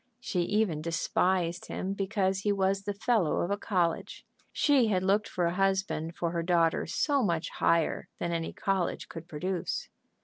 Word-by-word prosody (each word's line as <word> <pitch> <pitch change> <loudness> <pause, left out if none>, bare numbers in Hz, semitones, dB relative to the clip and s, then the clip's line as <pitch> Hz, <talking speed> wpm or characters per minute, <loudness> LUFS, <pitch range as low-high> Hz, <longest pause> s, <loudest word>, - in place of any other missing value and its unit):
She 200 -7 -2
even 185 -4 +1
despised 170 +2 0
him 190 +1 -3
because 195 -1 0
he 205 +1 +1
was 195 0 +1
the 205 - -1
fellow 210 -6 +1
of 175 - -1
a - - +3
college; 180 -5 -1 0.3
she 275 -6 +3
had 185 -3 +1
looked 200 +2 +2
for 175 - 0
a 170 - +1
husband 190 -3 0
for 170 -1 -1
her 170 -1 -1
daughter 165 -1 +2
so 285 - +1
much 170 -7 0
higher 165 -2 +1
than 170 - -2
any 165 -1 -2
college 195 -3 -1
could 165 0 -8
produce. 175 +2 -3
185 Hz, 170 wpm, -29 LUFS, 170-200 Hz, 0.3 s, a